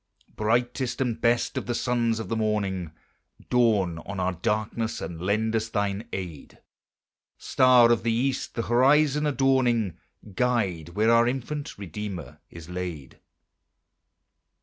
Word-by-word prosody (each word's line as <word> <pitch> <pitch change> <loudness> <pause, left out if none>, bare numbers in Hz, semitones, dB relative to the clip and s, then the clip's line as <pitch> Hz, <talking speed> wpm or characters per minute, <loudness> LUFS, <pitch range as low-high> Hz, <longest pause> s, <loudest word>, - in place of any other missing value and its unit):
2. - - -30
Brightest 120 +3 0
and 120 -4 -1
best 120 0 +1
of - - -10
the 120 - -1
sons 120 -2 0
of 110 - -5
the 115 - -2
morning, 100 -6 -1 0.6
Dawn 105 -9 +2
on 100 +2 -7
our 90 0 +1
darkness, 110 +5 -2
and 85 -2 -6
lend 110 +4 0
us 110 0 -1
thine 100 +1 -2
aid; 85 -7 -7 0.8
Star 125 -2 +5
of 120 - +2
the 115 +1 0
East, 130 +4 -1
the 115 - -1
horizon 145 +5 +3
adorning, 130 - +1 0.3
Guide 95 -8 -1
where 110 +2 +3
our 115 0 +5
infant 140 +4 -4
Redeemer 100 -2 -7
is 85 -1 -11
laid. 90 -6 -6
110 Hz, 135 wpm, -26 LUFS, 95-120 Hz, 0.8 s, Star